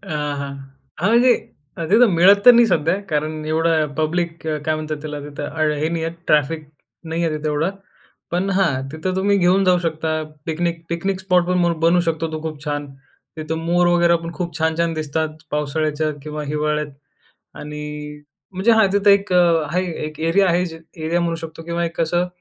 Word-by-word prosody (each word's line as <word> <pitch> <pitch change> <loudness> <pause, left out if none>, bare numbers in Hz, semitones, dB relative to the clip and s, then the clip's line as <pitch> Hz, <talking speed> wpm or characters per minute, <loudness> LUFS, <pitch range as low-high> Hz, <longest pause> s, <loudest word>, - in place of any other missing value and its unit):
हां, 150 -1 -2
हां. 140 0 -5 0.5
म्हणजे 240 +3 +5 0.6
तिथं 235 +2 +6
मिळत 190 +4 +7
तर 245 - +12
नाही 240 0 +6
सध्या 165 -3 +2
कारण 155 +1 -2
एवढा 160 0 +2
पब्लिक 165 +1 -1
काय 155 0 -1
म्हणतात 155 0 -4
त्याला? 150 -1 -5
तिथं 145 0 -5 0.3
हे 155 +2 0
नाही 165 -1 -2
आहे. 165 0 -3
ट्रॅफिक 150 +1 +1 0.4
नाही 165 +1 -2
आहे 155 -2 -1
तिथं 155 0 -4
एवढं 150 +5 0 0.6
पण 180 +3 0
हां. 160 -9 +1
तिथं 160 +4 -3
तुम्ही 200 +1 +2
घेऊन 185 +1 +3
जाऊ 180 -1 +4
शकता 160 -1 -2 0.2
पिकनिक 170 +1 -2
पिकनिक 185 +3 -2
स्पॉटपण 180 -2 +1
बनू 170 +2 +4
शकतो 160 0 -2
तो 155 - -4
खूप 155 -2 -6
छान. 145 -1 -3 0.5
तिथं 160 +1 -3
मोर 175 +1 +3
वगैरे 175 -1 +4
पण 165 - -5
खूप 175 -1 -4
छान-छान 165 +1 0
दिसतात, 155 0 -2 0.2
पावसाळ्याच्या 150 +1 -1
किंवा 150 0 -5
हिवाळ्यात. 150 +1 -1 0.7
आणि 150 0 -7 0.7
म्हणजे 190 +5 +2
हां, 220 -3 +5
तिथं 205 0 +3
एक 200 -1 +4
आहे 170 -1 +3 0.2
एक 155 0 -8
एरिया 165 +5 +3
आहे. 175 +1 +2
जे 165 -2 -8 0.3
एरिया 170 +2 +1
म्हणू 170 -1 0
शकतो 165 0 -8
किंवा 170 +1 -2
एक 165 - -6
कसं, 175 +2 +1
165 Hz, 170 wpm, -20 LUFS, 155-175 Hz, 0.7 s, तर